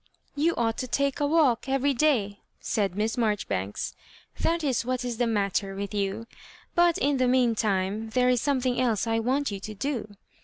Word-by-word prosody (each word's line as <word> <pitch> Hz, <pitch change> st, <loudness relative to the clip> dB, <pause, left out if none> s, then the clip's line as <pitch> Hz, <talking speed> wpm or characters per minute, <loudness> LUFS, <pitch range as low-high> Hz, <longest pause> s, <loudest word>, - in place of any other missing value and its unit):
" -, -, -46 dB
You 320 Hz, +4 st, +1 dB
ought 225 Hz, -1 st, 0 dB
to 255 Hz, -, -3 dB
take 280 Hz, +2 st, 0 dB
a 290 Hz, -, +2 dB
walk 285 Hz, -5 st, +2 dB
every 270 Hz, +1 st, +2 dB
day," 235 Hz, -8 st, +1 dB, 0.2 s
said 195 Hz, -4 st, -1 dB
Miss 220 Hz, +4 st, -1 dB
Marjoribanks, 200 Hz, -, -1 dB, 0.2 s
" -, -, -26 dB
that 335 Hz, 0 st, +1 dB
is 265 Hz, -6 st, +1 dB
what 250 Hz, +1 st, -2 dB
is 240 Hz, -2 st, -3 dB
the 240 Hz, -, +2 dB
matter 200 Hz, -2 st, 0 dB
with 200 Hz, +1 st, -5 dB
you; 200 Hz, +2 st, -2 dB, 0.5 s
but, 345 Hz, -1 st, +4 dB
in 280 Hz, 0 st, +1 dB
the 255 Hz, -1 st, +2 dB
mean 250 Hz, -2 st, +3 dB
time, 210 Hz, 0 st, -1 dB
there 250 Hz, +2 st, +2 dB
is 250 Hz, -2 st, +3 dB
some 280 Hz, -3 st, +1 dB
thing 250 Hz, 0 st, 0 dB
else 235 Hz, -4 st, +1 dB
I 225 Hz, 0 st, +1 dB
want 260 Hz, +3 st, 0 dB
you 200 Hz, -, -4 dB
to 215 Hz, +2 st, -7 dB
do. 220 Hz, -3 st, -4 dB
235 Hz, 205 wpm, -27 LUFS, 210-270 Hz, 0.5 s, but